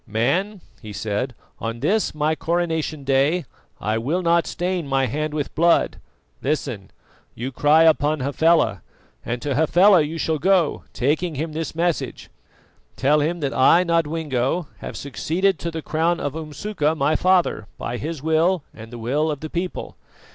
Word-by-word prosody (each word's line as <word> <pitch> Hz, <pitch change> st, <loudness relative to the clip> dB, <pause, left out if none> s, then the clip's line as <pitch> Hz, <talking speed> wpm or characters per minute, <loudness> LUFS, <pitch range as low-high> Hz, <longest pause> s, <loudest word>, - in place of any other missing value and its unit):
"Man," 175 Hz, -, 0 dB, 0.2 s
he 110 Hz, -3 st, -8 dB
said, 110 Hz, +4 st, -3 dB, 0.2 s
"on 115 Hz, +1 st, -4 dB
this 215 Hz, -, +1 dB
my 155 Hz, +1 st, +1 dB
coronation 160 Hz, -3 st, -1 dB
day 140 Hz, +5 st, +2 dB, 0.3 s
I 110 Hz, +2 st, -1 dB
will 160 Hz, +10 st, -1 dB
not 170 Hz, 0 st, +3 dB
stain 175 Hz, -3 st, -2 dB
my 135 Hz, -1 st, +2 dB
hand 150 Hz, +5 st, -2 dB
with 145 Hz, -2 st, -3 dB
blood. 170 Hz, +1 st, +3 dB, 0.4 s
Listen. 130 Hz, -8 st, -2 dB, 0.5 s
You 125 Hz, +3 st, -4 dB
cry 150 Hz, +5 st, +4 dB
upon 155 Hz, -1 st, +3 dB
Hafela, 140 Hz, -, +2 dB, 0.4 s
and 120 Hz, 0 st, -4 dB
to 145 Hz, -, -1 dB
Hafela 175 Hz, +6 st, +5 dB
you 155 Hz, +2 st, -3 dB
shall 160 Hz, -1 st, -1 dB
go, 180 Hz, -1 st, +2 dB
taking 155 Hz, +5 st, 0 dB
him 155 Hz, +3 st, -3 dB
this 160 Hz, 0 st, -4 dB
message. 170 Hz, 0 st, -2 dB, 0.6 s
Tell 145 Hz, +3 st, +3 dB
him 165 Hz, +3 st, -1 dB
that 140 Hz, -1 st, -1 dB
I, 165 Hz, +7 st, +5 dB
Nodwengo, 160 Hz, -3 st, 0 dB
have -, -, -7 dB
succeeded 175 Hz, +7 st, -1 dB
to 170 Hz, -, -3 dB
the 160 Hz, -1 st, -6 dB
crown 165 Hz, +2 st, 0 dB
of 145 Hz, -, -3 dB
Umsuka, 155 Hz, +1 st, -2 dB
my 150 Hz, +1 st, +1 dB
father, 180 Hz, -, +2 dB
by 120 Hz, -, -4 dB
his 155 Hz, +1 st, -5 dB
will 160 Hz, +2 st, +2 dB
and 110 Hz, +1 st, -11 dB
the 120 Hz, -, -7 dB
will 140 Hz, +7 st, 0 dB
of 150 Hz, -3 st, -3 dB
the 155 Hz, -, -6 dB
people. 180 Hz, +1 st, -4 dB
155 Hz, 160 wpm, -22 LUFS, 135-170 Hz, 0.6 s, Hafela